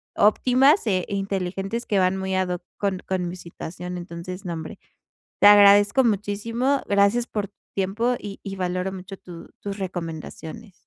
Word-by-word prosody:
óptimas 255 Hz, -, +4 dB
e 185 Hz, -3 st, +1 dB
inteligentes, 195 Hz, +2 st, -3 dB
que 205 Hz, -3 st, +1 dB
van 185 Hz, +1 st, +2 dB
muy 190 Hz, 0 st, -2 dB
ad 185 Hz, -1 st, 0 dB
hoc 180 Hz, -1 st, -3 dB
con 195 Hz, -2 st, -1 dB
con 185 Hz, -2 st, -1 dB
mi 180 Hz, -, -6 dB
situación. 180 Hz, +1 st, -7 dB
Entonces, 175 Hz, +2 st, -7 dB
no, 175 Hz, -, -3 dB
hombre, 160 Hz, -1 st, -7 dB, 0.6 s
te 205 Hz, -, +7 dB
agradezco 205 Hz, +4 st, +7 dB
muchísimo. 230 Hz, +5 st, 0 dB
Gracias 200 Hz, +4 st, +3 dB
por 205 Hz, -2 st, -3 dB
tu -, -, -47 dB, 0.2 s
tiempo. 210 Hz, +6 st, 0 dB
Y 200 Hz, -1 st, -8 dB
y 195 Hz, -1 st, -5 dB
valoro 185 Hz, 0 st, -2 dB
mucho, 190 Hz, +1 st, -8 dB
tu 170 Hz, -2 st, -11 dB
tus 200 Hz, 0 st, -5 dB
recomendaciones. 175 Hz, +2 st, -6 dB
195 Hz, 160 wpm, -24 LUFS, 180-205 Hz, 0.6 s, te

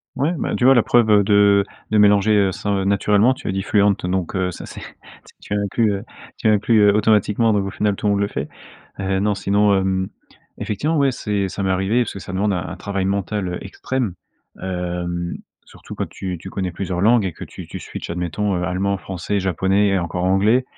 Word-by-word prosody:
Ouais, 140 Hz, +5 st, +1 dB
ben, -, -, -2 dB
tu -, -, -2 dB
vois, 130 Hz, +2 st, +7 dB
la 120 Hz, -, +5 dB
preuve, 120 Hz, -2 st, +3 dB
heu, 105 Hz, -1 st, +6 dB
de 100 Hz, -1 st, +4 dB, 0.3 s
de 110 Hz, -, +3 dB
mélanger 105 Hz, -1 st, +4 dB
ce 105 Hz, -, -4 dB
heu, 100 Hz, -1 st, +1 dB
naturellement 105 Hz, +4 st, +3 dB
tu -, -, -7 dB
as -, -, +1 dB
dit: 95 Hz, 0 st, -2 dB
«fluent», 105 Hz, 0 st, +3 dB
heu, -, -, -2 dB
donc 90 Hz, -1 st, -2 dB
heu, 95 Hz, -1 st, 0 dB
ça, -, -, -9 dB
c'est, -, -, -10 dB, 0.6 s
tu -, -, -6 dB
as 105 Hz, -, +1 dB
inclus, 105 Hz, +2 st, +1 dB
heu, 100 Hz, +1 st, -4 dB, 0.3 s
tu -, -, -1 dB
as -, -, +6 dB
inclus, 110 Hz, +2 st, +3 dB
heu, 105 Hz, -1 st, +5 dB
automatiquement 105 Hz, +1 st, +3 dB
donc 100 Hz, -2 st, +1 dB
au -, -, -3 dB
final, 105 Hz, 0 st, 0 dB
tout 105 Hz, -, -3 dB
le -, -, +3 dB
monde 100 Hz, -, 0 dB
le 100 Hz, -, +1 dB
fait. 70 Hz, -4 st, -4 dB, 0.5 s
Heu, 95 Hz, 0 st, 0 dB
non, 105 Hz, +1 st, +1 dB
sinon, 100 Hz, +1 st, +2 dB
hem, 95 Hz, 0 st, 0 dB, 0.5 s
effectivement, 150 Hz, +10 st, -1 dB
ouais, 140 Hz, -2 st, +3 dB
c'est 105 Hz, -5 st, -2 dB
ça 100 Hz, +2 st, -4 dB
m'est 95 Hz, -, 0 dB
arrivé 95 Hz, +6 st, +1 dB
parce 115 Hz, -, -6 dB
que 100 Hz, -, -7 dB
ça 95 Hz, -, -8 dB
demande 100 Hz, +2 st, 0 dB
un 90 Hz, -, -1 dB
un 95 Hz, -, -7 dB
travail 100 Hz, 0 st, -3 dB
mental, 100 Hz, 0 st, -1 dB
heu, 90 Hz, -, -3 dB
extrême, 115 Hz, +2 st, -3 dB, 0.5 s
hem, 90 Hz, -1 st, -3 dB, 0.3 s
surtout -, -, -12 dB
quand -, -, -3 dB
tu 90 Hz, -2 st, -5 dB
tu 95 Hz, -, -9 dB
connais 95 Hz, -1 st, -3 dB
plusieurs 90 Hz, 0 st, -3 dB
langues 110 Hz, +1 st, +4 dB
et 90 Hz, -, -3 dB
que -, -, -9 dB
tu -, -, -10 dB
tu -, -, -7 dB
switch -, -, -8 dB
admettons, 90 Hz, +4 st, -2 dB
heu, 90 Hz, -, -2 dB
allemand, 95 Hz, +2 st, 0 dB
français, 95 Hz, +2 st, -3 dB
japonais 95 Hz, +2 st, +1 dB
et 95 Hz, -1 st, +1 dB
encore 90 Hz, +1 st, -3 dB
anglais. 100 Hz, +7 st, +3 dB
100 Hz, 230 wpm, -20 LUFS, 95-105 Hz, 0.6 s, vois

